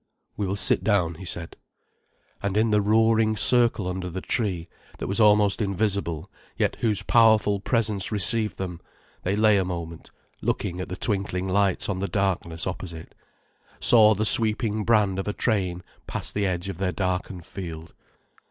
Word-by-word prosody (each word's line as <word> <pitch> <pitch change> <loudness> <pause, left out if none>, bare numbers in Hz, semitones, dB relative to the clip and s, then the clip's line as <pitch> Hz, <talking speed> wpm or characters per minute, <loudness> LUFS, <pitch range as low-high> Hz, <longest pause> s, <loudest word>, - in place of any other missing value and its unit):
"We 100 - -2
will 95 - -1
sit 100 - +4
down," 90 -6 +1
he 95 +3 -10
said. 85 -1 -6 0.8
And 100 0 -1
in 110 +1 +2
the 105 0 +3
roaring 110 +1 +3
circle 120 -3 +2
under 90 0 -4
the 90 +2 -5
tree, 90 -5 -2 0.3
that - - -5
was 100 - -1
almost 105 -1 +4
invisible 100 -5 -1 0.3
yet - - 0
whose 110 -5 0
powerful 110 -3 +4
presence 105 -3 -1
received 105 +2 -1
them, 90 -3 -5 0.4
they 95 +2 -1
lay 105 -1 +4
a - - +1
moment 85 -2 -6 0.3
looking 90 +1 -2
at 95 - -6
the 90 - -5
twinkling 95 -4 -1
lights 95 0 +1
on 95 -2 -2
the 100 - -2
darkness 85 -3 -1
opposite, 85 -3 -6 0.7
saw 110 -2 +6
the 110 +2 -1
sweeping 110 -2 +2
brand 105 -5 +2
of 95 - -4
a 105 - -1
train 95 -7 -1 0.2
past - - -4
the 100 -1 0
edge 90 0 -3
of 95 -3 -6
their 95 -1 0
darkened 90 -1 -3
field. 85 -4 -8
100 Hz, 165 wpm, -25 LUFS, 90-110 Hz, 0.8 s, saw